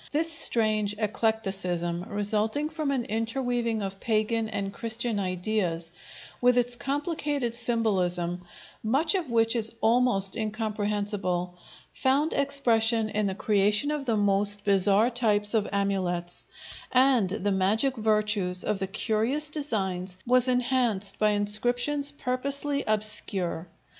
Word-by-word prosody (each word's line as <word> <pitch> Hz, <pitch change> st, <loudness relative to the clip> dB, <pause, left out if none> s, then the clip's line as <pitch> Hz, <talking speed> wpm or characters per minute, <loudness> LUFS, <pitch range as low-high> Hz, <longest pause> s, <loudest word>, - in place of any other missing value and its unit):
This 320 Hz, +3 st, +1 dB
strange 215 Hz, -7 st, +3 dB
eclecticism, 195 Hz, -5 st, -1 dB
resulting 215 Hz, +8 st, 0 dB
from 315 Hz, -3 st, -3 dB
an 260 Hz, -4 st, -1 dB
interweaving 230 Hz, 0 st, -2 dB
of 195 Hz, 0 st, -5 dB
pagan 220 Hz, 0 st, 0 dB
and 200 Hz, -2 st, -4 dB
Christian 230 Hz, -1 st, -1 dB
ideas, 185 Hz, -3 st, -2 dB, 0.5 s
with 245 Hz, 0 st, +4 dB
its 245 Hz, 0 st, +2 dB
complicated 285 Hz, -2 st, -2 dB
symbolism, 185 Hz, -7 st, 0 dB, 0.4 s
much 270 Hz, -, +1 dB
of 360 Hz, -8 st, -2 dB
which 225 Hz, 0 st, +2 dB
is 225 Hz, 0 st, +1 dB
almost 225 Hz, -4 st, +3 dB
incomprehensible, 205 Hz, -4 st, -2 dB, 0.4 s
found 280 Hz, +4 st, +1 dB
expression 235 Hz, -6 st, +2 dB
in 210 Hz, -1 st, -1 dB
the 190 Hz, -, -3 dB
creation 210 Hz, +7 st, +2 dB
of 295 Hz, -2 st, -3 dB
the 225 Hz, -2 st, +1 dB
most 205 Hz, 0 st, +1 dB
bizarre 200 Hz, +3 st, +3 dB
types 210 Hz, -3 st, +1 dB
of 215 Hz, -2 st, +1 dB
amulets, 185 Hz, -3 st, -2 dB, 0.5 s
and 255 Hz, -6 st, +4 dB
the 205 Hz, +1 st, -2 dB
magic 210 Hz, +8 st, +1 dB
virtues 210 Hz, -5 st, 0 dB
of 210 Hz, -2 st, -1 dB
the 190 Hz, -, -2 dB
curious 225 Hz, +9 st, -1 dB
designs 190 Hz, -, -3 dB
was 250 Hz, +1 st, +3 dB
enhanced 245 Hz, -6 st, 0 dB
by 215 Hz, -, +3 dB
inscriptions 245 Hz, +8 st, +1 dB
purposely 280 Hz, +1 st, -2 dB
obscure. 205 Hz, -5 st, -2 dB
220 Hz, 120 wpm, -27 LUFS, 200-245 Hz, 0.5 s, with